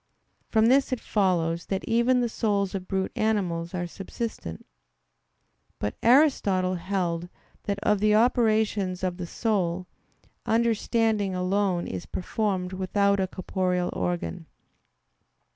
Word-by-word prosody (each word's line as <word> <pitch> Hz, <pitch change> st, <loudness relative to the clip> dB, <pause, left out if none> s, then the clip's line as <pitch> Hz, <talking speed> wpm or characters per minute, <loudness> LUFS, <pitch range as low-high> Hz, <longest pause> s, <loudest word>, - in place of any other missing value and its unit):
From 220 Hz, -1 st, +3 dB
this 270 Hz, +4 st, +4 dB
it 255 Hz, -, -1 dB
follows 170 Hz, -6 st, 0 dB
that 190 Hz, -1 st, -2 dB
even 235 Hz, +2 st, +2 dB
the 240 Hz, -, +1 dB
souls 205 Hz, -4 st, 0 dB
of 185 Hz, -2 st, -5 dB
brute 190 Hz, -1 st, -1 dB
animals 185 Hz, -6 st, -1 dB
are 175 Hz, -1 st, -2 dB
subsistent. 190 Hz, -, -6 dB, 1.1 s
But 105 Hz, -, -2 dB
Aristotle 220 Hz, -8 st, +4 dB
held 175 Hz, -1 st, -2 dB, 0.4 s
that 200 Hz, -1 st, -1 dB
of 210 Hz, -1 st, +3 dB
the 210 Hz, +1 st, +3 dB
operations 215 Hz, -5 st, +2 dB
of 180 Hz, -1 st, -1 dB
the 180 Hz, -2 st, -5 dB
soul, 185 Hz, -4 st, -1 dB, 0.6 s
understanding 225 Hz, -3 st, +1 dB
alone 185 Hz, -1 st, 0 dB
is 90 Hz, -2 st, -6 dB
performed 190 Hz, -1 st, -2 dB
without 200 Hz, +2 st, +1 dB
a 190 Hz, -, +1 dB
corporeal 180 Hz, -1 st, -1 dB
organ. 175 Hz, -1 st, -3 dB
195 Hz, 120 wpm, -26 LUFS, 180-220 Hz, 1.1 s, this